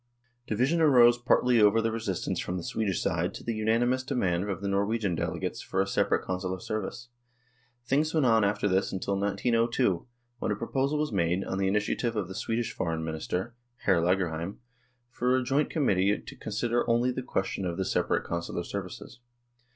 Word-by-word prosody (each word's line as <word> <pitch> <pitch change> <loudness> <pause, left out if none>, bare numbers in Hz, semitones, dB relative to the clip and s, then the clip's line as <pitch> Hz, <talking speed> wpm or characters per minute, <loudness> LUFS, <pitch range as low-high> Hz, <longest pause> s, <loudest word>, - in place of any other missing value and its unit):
Division 130 +10 +1
arose 120 -5 +6
partly 125 -1 +3
over 105 +2 +5
the 115 0 +1
resistance 110 -5 -2
from 90 - -3
the 85 - -5
Swedish 100 -2 -1
side - - -1
to - - -8
the 115 - -2
unanimous 115 +4 +1
demand 100 -8 -1
of 95 - -2
the 100 - -4
Norwegian 100 0 0
delegates 80 - -3
for 95 - -3
a 95 - +3
separate 95 - +1
Consular 95 0 -3
service. 110 +4 -5 0.8
Things 145 +5 +1
went 155 -4 +2
on 115 -3 +4
after 100 +1 +1
this 95 0 +1
until 95 +1 -2
1902, 115 +1 +1 0.3
when - - -1
a - - +1
proposal 135 +7 -1
was 150 -2 -1
made, 90 -1 +1
on 95 - -3
the 95 - +1
initiative 105 +4 0
of 105 -4 -1
the 95 - -7
Swedish 115 +4 -2
Foreign 80 -2 -2
Minister, 80 +7 -3 0.3
Hr. 95 -4 +4
Lagerheim, 85 0 0 0.5
for 125 0 +1
a 130 - 0
joint 140 +4 +1
com 155 -4 0
mittee 100 0 +2
to - - -9
consider 115 +3 -1
only 120 +2 +3
the 130 - -3
question 95 -5 -2
of 85 -1 -3
the 95 - -1
separate - - 0
Consular 85 0 -3
services. - - -7
105 Hz, 180 wpm, -28 LUFS, 95-120 Hz, 0.8 s, arose